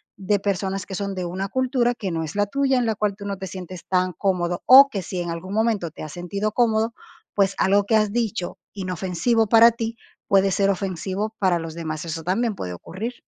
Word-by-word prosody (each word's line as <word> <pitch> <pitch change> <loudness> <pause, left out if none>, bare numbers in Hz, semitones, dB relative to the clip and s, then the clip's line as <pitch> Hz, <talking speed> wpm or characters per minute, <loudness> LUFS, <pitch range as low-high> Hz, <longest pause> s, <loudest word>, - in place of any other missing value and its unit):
de 200 +1 0
personas 195 -1 -2
que 190 - -6
son 200 0 -3
de 185 - -3
una 190 +3 -3
cultura 250 -2 +1
que 195 -6 -4
no 165 -1 -2
es 155 - -6
la 205 - +3
tuya, 270 +4 +1
en 245 - +1
la 220 -1 0
cual, 205 -1 -1
tú 200 - -9
no 200 -1 -3
te 190 - -6
sientes 185 -1 -8
tan 185 -1 +1
cómodo, 175 -2 -1
o 275 +2 +10
que 195 -6 -3
si 180 +1 -5
en 175 -1 -3
algún 185 +4 -6
momento 215 -7 0
te - - -11
has 155 -1 -7
sentido 200 +5 -3
cómodo, 225 -1 +2 0.4
pues, 195 -1 +2
algo 200 +1 +3
que 220 +1 +3
has 215 -1 +1
dicho 220 -7 -2 0.2
inofensivo 190 +4 0
para 230 +2 +7
ti, 230 0 -4 0.3
puede 195 0 +4
ser 195 +1 +2
ofensivo 195 +2 -2
para 180 -3 +2
los 165 -1 -7
demás, 155 -2 -4
eso 160 0 -5
también 210 +5 0
puede 90 - -5
ocurrir. 205 - -6
195 Hz, 220 wpm, -23 LUFS, 180-220 Hz, 0.4 s, o